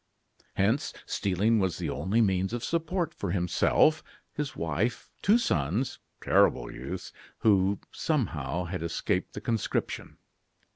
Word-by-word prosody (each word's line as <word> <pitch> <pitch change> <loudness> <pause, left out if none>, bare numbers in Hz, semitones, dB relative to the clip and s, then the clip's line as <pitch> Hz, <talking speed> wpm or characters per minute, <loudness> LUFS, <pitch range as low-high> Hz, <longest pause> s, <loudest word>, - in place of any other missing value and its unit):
Hence, 110 +8 +1
stealing 100 +4 +1
was 95 -4 0
the - - -2
only 110 +5 +1
means 95 -1 +1
of 120 -1 -3
support 165 0 -1
for 100 - -4
himself, 90 - +3 0.3
his 145 -3 -3
wife, 85 - -2
two 210 +4 +5
sons 95 - 0 0.2
terrible - - +3
youths, - - -6 0.3
who, 100 -2 +3
somehow, 90 - -1
had 90 +1 -4
escaped 85 0 -1
the - - -6
conscription. 115 -3 -2
100 Hz, 125 wpm, -28 LUFS, 90-130 Hz, 0.3 s, two